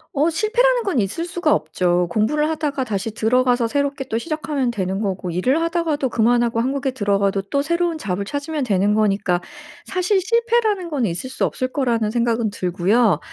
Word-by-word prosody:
어 295 +4 +3
실패라는 480 +8 +2
건 380 - 0
있을 215 - -1
수가 345 -3 +1
없죠. 175 +2 0
공부를 295 - +1
하다가 300 -4 -1
다시 215 -2 -3
들어가서 245 +1 +2
새롭게 280 +2 -1
또 225 - 0
시작하면 305 -3 -2
되는 195 -3 -2
거고 185 -4 -3
일을 250 - +1
하다가도 330 -5 0
그만하고 235 0 +2
한국에 265 +2 -1
들어가도 200 -4 0
또 280 +8 -1
새로운 340 +1 0
잡을 200 -8 -3
찾으면 285 +6 -3
되는 205 -3 +2
거니까 200 -4 +1 0.4
사실 380 +1 +1
실패라는 450 -3 +1
건 275 -7 0
있을 190 +9 -4
수 - - 0
없을 255 - -2
거라는 230 -6 0
생각은 235 -2 0
들고요. 190 +4 +2
250 Hz, 395 characters per minute, -21 LUFS, 205-315 Hz, 0.4 s, 어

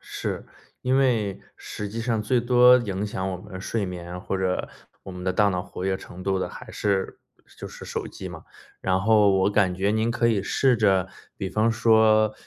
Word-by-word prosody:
是， - - -5 0.4
因 130 +1 +2
为 115 -7 +1 0.2
实 105 - -6
际 115 +3 -5
上 115 -2 -1
最 120 +3 +1
多 125 +1 +6
影 105 -3 -3
响 95 -2 -3
我 90 - -3
们 95 +1 -10
睡 105 0 -2
眠 90 0 -7
或 95 - -3
者 95 -1 -1 0.4
我 95 - -8
们 90 0 -8
的 95 - +1
大 100 +2 +3
脑 90 -2 -1
活 90 - -7
跃 95 0 0
程 90 0 -11
度 95 0 0
的 95 - -2
还 - - -11
是 100 -2 -2 0.4
就 - - -6
是 - - -11
手 - - -4
机 - - -8
嘛。 - - -10 0.4
然 95 0 +1
后 105 0 +4
我 95 +1 +2
感 100 -3 +2
觉 100 +2 0
您 110 +2 +1
可 120 0 +1
以 105 -4 +1
试 130 +4 +2
着 95 -4 +2 0.3
比 95 - -3
方 110 +3 +1
说， 110 -2 +4
105 Hz, 220 characters per minute, -25 LUFS, 95-115 Hz, 0.4 s, 多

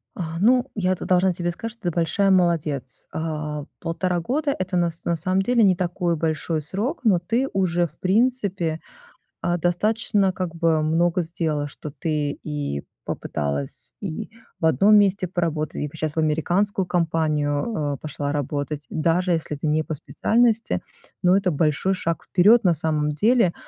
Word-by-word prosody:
А, 165 -2 -4
ну, 245 +6 +3
я 185 -3 +1
тут - - -7
должна 185 0 +3
тебе 175 0 -2
сказать, 225 +6 -6
что 230 - -23
ты 175 - 0
большая 170 +4 +1
молодец. 160 - +1
Э, 150 -2 -3
1.5 175 +2 -1
года- 280 - 0
это, 185 0 -1
на 175 -1 +2
с 165 - -11
на 170 - +1
самом 185 +4 +1
деле, 235 +3 +3
не 190 -3 +5
такой 175 -1 -1
большой 160 0 -1
срок, 205 - -3
но 210 -6 +4
ты 230 +10 0
уже, 175 -3 +1
в - - -26
принципе, 195 -6 +1 0.6
а, 175 0 0
достаточно 195 +3 +1
как 185 -2 -4
бы 165 -2 +2
много 170 +3 +2
сделала, 160 -3 -2
что 150 +1 -8
ты 150 0 -2
и 145 - -3 0.2
попыталась 75 - -3
и 200 +3 -5 0.3
в - - 0
одном 160 +8 +5
месте 195 -2 +3
поработать, 165 -3 -2
и - - -2
вот - - -12
сейчас 155 -2 -3
в - - 0
американскую 175 +5 +1
компанию, 155 -1 0
э, - - -10
пошла 145 -1 -3
работать, 145 0 -3
даже 170 +3 +1
если 160 -2 -2
ты 145 +2 -3
не 155 +1 +2
по 155 - -4
специальности. 225 - +1 0.4
Но 180 +1 +5
это 190 -2 +1
большой 155 +5 +1
шаг 170 -3 -2
вперед, 210 +6 +5
на 180 -3 +4
самом 150 -1 0
деле, 210 - +3
170 Hz, 170 wpm, -23 LUFS, 155-190 Hz, 0.6 s, не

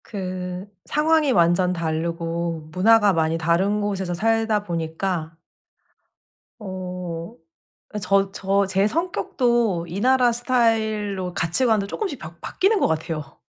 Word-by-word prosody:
그 185 -1 -5 0.2
상황이 305 -1 +2
완전 175 -2 +3
다르고 165 -1 -3
문화가 210 +3 +4
많이 160 -1 +1
다른 185 +6 +1
곳에서 195 -3 -2
살다 225 +2 +1
보니까 165 -1 -3 1.3
어 180 -1 -6 0.6
아 210 - -4
저 195 0 +2
저 195 0 +1
제 195 +1 +2
성격도 240 - 0
이 180 +4 -4
나라 250 0 +4
스타일로 220 -6 0
가치관도 210 +5 +1
쪼끔씩 335 - -4
바 160 +1 -9
바뀌는 405 +2 +1
것 - - +4
같아요. 155 -2 -4
195 Hz, 240 characters per minute, -23 LUFS, 170-225 Hz, 1.3 s, 문화가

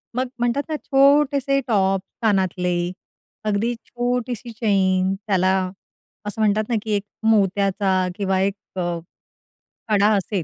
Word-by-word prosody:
मग 255 +1 0
म्हणतात 240 +4 +1
ना, 310 - -1
छोटेसे 275 0 +3
टॉप, 195 -4 +2 0.2
कानातले, 180 -4 +1 0.5
अगदी 215 +3 0
छोटीशी 245 -1 -3
चैन 190 -4 +1
त्याला 190 -2 +1 0.8
असं 210 +2 -4
म्हणतात 215 0 +3
ना, 235 - +1
की 220 - -4
एक 200 - -1 0.3
मोत्याचा 195 -2 +2
किंवा 195 -2 0
एक 195 0 +1 1.3
कडा 210 -1 +4
असेल. 195 -1 -2
205 Hz, 115 wpm, -22 LUFS, 190-240 Hz, 1.3 s, कडा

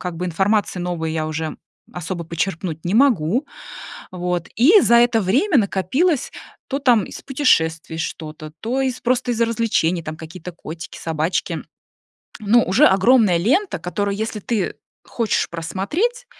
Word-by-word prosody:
как 180 -2 -5
бы, 180 - -3
информации 190 +2 0
новой 165 -3 -3
я 155 -1 -2
уже 155 0 -4 0.4
особо 175 0 -5
почерпнуть 165 -1 -3
не 180 - -1
могу, 240 - +3 0.7
вот. 180 -1 -3
И 340 - +7
за 235 - +3
это 235 -1 +4
время 270 - +2
накопилось, 235 - +1 0.4
то 275 - -1
там 245 -7 +3
из - - -9
путешествий 165 - +1
что-то, 155 -1 -6
то 250 +4 -1
из 260 -2 -1
просто 245 0 0
из 235 - -3
развлечений, 220 -7 +1
там 155 0 -6
какие-то 170 +2 -9
котики, 165 0 -9
собачки. 160 +2 -2 0.8
Но 220 +3 +4
уже 220 +12 +4
огромная 195 -2 +4
лента, 280 - +1
которую, 200 +4 -2
если 220 0 -3
ты 215 -2 -2 0.3
хочешь 230 -3 -1
просмотреть, 295 - -2
195 Hz, 145 wpm, -20 LUFS, 165-240 Hz, 0.8 s, И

